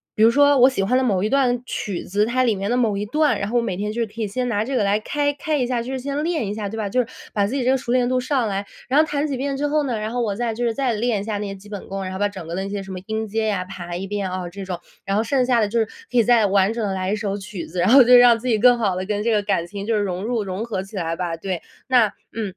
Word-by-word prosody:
比 - - -1
如 225 - +8
说 285 +2 +4
我 255 +2 +7
喜 245 -7 -1
欢 225 +6 +1
的 260 - +3
某 195 -6 +1
一 215 - +1
段 255 -3 +2
曲 200 -7 -4
子， 205 +3 0
它 255 +3 +1
里 235 - +3
面 195 +1 -3
的 245 - +1
某 225 -5 +2
一 200 - -2
段， 300 +5 +2
然 200 +1 -2
后 245 - +1
我 235 - +2
每 190 -6 -2
天 205 +3 -3
就 230 +1 -1
可 220 +2 -9
以 215 - 0
先 250 +5 -2
拿 210 -3 0
这 265 +4 -3
个 220 - +2
来 205 +1 +2
开 290 +5 -1
开 300 +2 -2
一 255 - +1
下， 245 -1 -1
就 250 - -6
是 265 - -2
先 280 +3 -3
练 325 - -1
一 200 - -3
下， 210 -2 -4
对 225 - -6
吧？ 215 -2 -2
就 250 +6 +1
是 240 - -5 0.3
把 200 -1 +1
自 255 - -3
己 265 - 0
这 255 - +3
个 265 - +3
熟 240 - -4
练 250 -1 +3
度 255 0 +1
上 255 -2 0
来， 200 -1 -2 0.2
然 275 +4 +3
后 - - +7
弹 290 0 -1
几 280 -4 -2
遍 275 +1 -2
之 290 +1 0
后 300 +1 +1
呢， 250 -5 -2
然 215 +1 -3
后 245 - -1
我 210 -4 -1
再 235 +1 -1
就 240 +2 -3
是 230 - +1
再 265 -4 0
练 220 -1 0
一 - - -5
下 210 -1 -3
那 205 - -3
个 195 - -8
基 205 - -15
本 205 -2 -7
功， 195 0 -4
然 185 - -5
后 190 - -5
把 205 0 +2
整 190 -5 -9
个 165 - -5
的 190 - -2
那 195 - -5
些 200 -1 -4
什 190 - -9
么 185 - -5
音 220 0 -2
阶 220 +1 -1
呀， 195 -4 -1
排 175 -2 -6
1 190 - -4
遍， 200 -1 -3
啊， 185 -1 -4
这 195 +2 -8
种。 185 -2 -4 0.3
然 195 +1 -1
后 220 - +2
剩 255 +1 +1
下 245 -2 +3
的 215 - +2
就 230 +2 0
是 225 - +2 0.3
可 250 - 0
以 230 - +5
再 235 -1 +4
完 195 0 +3
整 230 -2 -2
地 195 - -2
来 185 +1 -2
一 - - +1
首 205 -2 -2
曲 195 -3 -7
子， 175 +2 -6
然 180 - +3
后 265 +2 +9
就 245 +1 +5
让 245 -1 +7
自 245 - -7
己 225 -3 +2
更 245 +2 +6
好 205 -5 0
地 185 +1 -3
跟 210 0 -2
这 230 - +1
个 210 - +3
感 200 -4 0
情 200 +3 -7
就 225 - +2
融 190 -1 -2
入、 230 -2 -1
融 190 +2 -4
合 220 -5 -3
起 195 +2 -13
来 165 -3 -2
吧。 175 -1 -3
对。 185 0 -4 0.3
那 245 -4 +5 0.3
嗯。 215 -4 -3
220 Hz, 370 characters per minute, -22 LUFS, 195-245 Hz, 0.3 s, 后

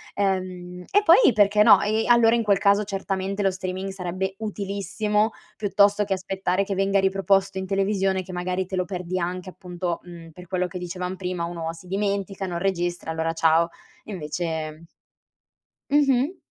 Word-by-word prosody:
ehm, 185 -2 -2
e 410 +1 +3
poi 395 - +6
perché 205 0 +4
no, 205 -2 +7
e 215 +2 0
allora 235 -1 +5
in 235 - +2
quel 205 -3 +3
caso 200 +1 +3
certamente 195 0 -3
lo 195 - +3
streaming 185 +1 -4
sarebbe 190 0 -3
utilissimo, 210 +1 -1 0.2
piuttosto 205 0 +3
che 200 -1 -1
aspettare 190 0 -1
che 195 - -3
venga 195 +1 +2
riproposto 195 0 +1
in 190 - -5
televisione, 195 -1 0
che 185 0 -10
magari 180 +1 -2
te 190 - -5
lo 185 -1 0
perdi 180 0 -4
anche, 180 +1 -3
appunto, 180 -1 -4
uhm, 170 -2 -11
per 180 +2 -12
quello 180 0 -1
che 180 0 -6
dicevam 180 +1 -4
prima, 180 -2 -4
uno 170 -1 -4
si 165 +2 -14
dimentica, 195 0 -2
non 175 -1 -3
registra, 175 -2 -2
allora 160 0 -1
ciao. 165 +1 +3 0.4
Invece 160 -3 -4 1.1
Mh-mh. 285 +3 +3
190 Hz, 165 wpm, -24 LUFS, 180-200 Hz, 1.1 s, no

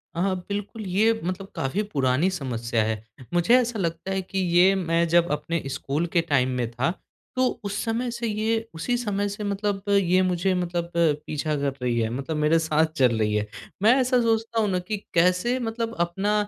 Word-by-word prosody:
अ, - - -3
हाँ 190 -1 +1
बिल्कुल। 205 +1 -4
ये 215 +5 +3
मतलब 185 +2 -3
काफ़ी 135 +11 -1
पुरानी 135 +6 +2
समस्या 120 -9 -1
है। 110 0 -2 0.3
मुझे 175 +7 +4
ऐसा 235 -3 -1
लगता 170 +1 -2
है 190 0 0
कि 190 +1 -4 0.2
ये 185 +2 +6
मैं 170 -2 +1
जब 170 +1 +4
अपने 165 +2 -1
स्कूल 140 +4 -2
के 170 - +5
टाइम 140 -6 +1
में 120 -2 -1
था 125 +8 0 0.4
तो 255 0 +3 0.2
उस 205 0 -3
समय 235 +2 -1
से 235 0 -3
ये 225 +1 -1
उसी 245 +10 -1
समय 205 -4 -1
से 205 +1 -6
मतलब 200 -1 -2
ये 185 -2 +4
मुझे 185 +1 +1
मतलब 175 -1 -2
पीछा 150 -2 0
कर 140 -1 0
रही 120 -2 0
है 110 -1 0
मतलब 140 +6 -3
मेरे 150 +2 +3
साथ 160 0 +2
चल 125 -4 +3
रही 105 -1 +1
है। 105 0 0 0.4
मैं 225 +3 +7
ऐसा 255 0 +3
सोचता 225 0 +1
हूँ 210 - +1
ना 185 -1 0
कि 210 +4 -3 0.2
कैसे 180 +8 +3
मतलब 230 0 -3
अपना 190 +5 0
180 Hz, 195 wpm, -25 LUFS, 150-210 Hz, 0.4 s, मैं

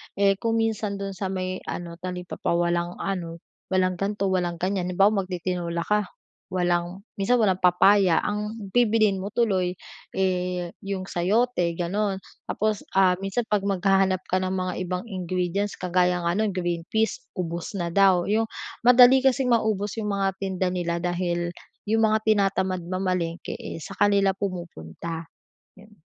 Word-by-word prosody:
Eh, 195 -1 +3
kung 230 0 0
minsan, 220 -2 -1
dun 195 0 -4
sa 190 0 -3
may 185 -1 -3
ano, 170 -1 -6
talipapa 180 -1 -3
walang 175 0 0
ano, 170 -4 -4 0.3
walang 185 -1 +1
gan'to, 195 -1 -1
walang 175 -2 0
ganyan. 185 +1 -1
Halimbawa, 195 +1 +2
mag-titinola 175 -2 -2
ka, 210 -2 +1 0.4
walang 175 +1 -1 0.2
minsan 245 +6 +3
walang 190 -5 +2
papaya. 180 0 +5
Ang 210 -1 -4
bibilhin 215 -4 +3
mo 195 - -4
tuloy, 190 -6 +1 0.4
eh, 180 -2 -1
yung 195 -2 -3
sayote, 185 -1 +1
gano'n. 195 +3 -1 0.3
Tapos, 215 -1 0
ah, 190 -1 +5
minsan 195 +5 -1
'pag 210 -3 +1
maghahanap 190 -1 +2
ka 185 - +1
ng 185 0 -1
mga 185 -1 -2
ibang 180 +2 -2
ingredients, 185 0 -2
kagaya 180 -1 +1
nga 170 - +1
no'n, 215 +1 +1
green 175 -1 -2
peas, 220 - 0 0.2
ubos 170 +3 -4
na 170 -1 -2
daw. 190 -3 +5
Yung 220 +2 +1 0.4
madali 250 +1 +8
kasing 265 -1 +2
maubos 210 -3 +1
yung 210 -1 -2
mga 195 0 +1
tinda 185 -1 -1
nila 170 -1 -1
dahil 175 0 -1 0.4
yung 225 0 +3
mga 215 - +3
tinatamad 195 -3 +2
mamalengke, 180 -2 -2
eh, - - -7
sa - - -7
kanila 200 -1 +4
pumupunta, 170 - -6 0.5
'yon. 210 -3 -19
185 Hz, 150 wpm, -25 LUFS, 175-205 Hz, 0.5 s, madali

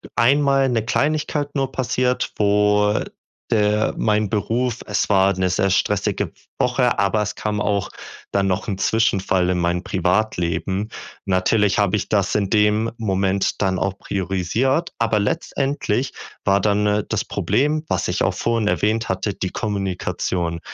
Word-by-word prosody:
einmal 135 +3 +3
'ne 115 -3 0
Kleinigkeit 145 +2 -1
nur 135 -2 0
passiert, 125 0 0
wo 105 0 +3 0.5
der 105 0 +2
mein 105 -1 +1
Beruf 115 +3 -1
es 105 - 0
war 100 -1 +4
'ne 95 -1 +1
sehr 95 +2 +1
stressige 95 - 0 0.3
Woche, 125 0 +2
aber 100 +2 +2
es 105 - -3
kam 105 -1 -2
auch 100 -1 0 0.4
dann 100 -1 +2
noch 95 +2 -1
'n 100 -3 -2
Zwischenfall 95 -5 +1
in 90 - +1
mein 85 +1 0
Privatleben. 95 +1 0 0.4
Natürlich 100 +2 +2
habe 100 -1 +2
ich 105 - -3
das 100 -3 +1
in 100 -2 +1
dem 105 +1 +2
Moment 95 -2 0
dann 95 -2 +1
auch 100 0 -2
priorisiert, 100 - -1
aber 115 -2 +2
letztendlich 135 +1 -1 0.3
war 100 0 +4
dann, 105 0 +2
äh, 105 0 +1
das - - 0
Problem, 150 +8 0
was - - -1
ich - - -1
auch - - +2
vorhin 115 -2 0
erwähnt 110 +2 +1
hatte, 95 +2 -1
die 95 -1 -3
Kommunikation. 90 -4 -2
105 Hz, 150 wpm, -21 LUFS, 95-115 Hz, 0.5 s, war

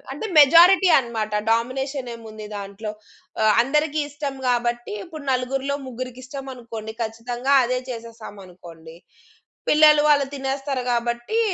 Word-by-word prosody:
ఆహ్, - - -23
అంటే 295 +11 -5
మెజారిటీ 345 +6 +7
అన్నమాట. 225 -4 -3 0.2
డామినేషన్ 255 +3 -2
ఏముంది 220 -2 -10
దాంట్లో? 200 +2 -6 0.5
ఆహ్, 215 -1 +4
అందరికీ 300 +4 0
ఇష్టం 285 -1 -5 0.2
కాబట్టి 240 -1 -1
ఇప్పుడు 310 -4 -10
నలుగురిలో 270 +2 -1
ముగ్గురికిష్టమనుకోండి 255 -3 -8
ఖచ్చితంగా 240 +4 -2
అదే 250 +1 -1
చేసేసాం 230 -3 -9
అనుకోండి. 165 -2 -14 0.7
పిల్లలు 300 -1 +6
వాళ్ళు 285 -2 +4
తినేస్తారు 270 0 -3
కాబట్టి 240 - -1
250 Hz, 115 wpm, -22 LUFS, 230-280 Hz, 0.7 s, మెజారిటీ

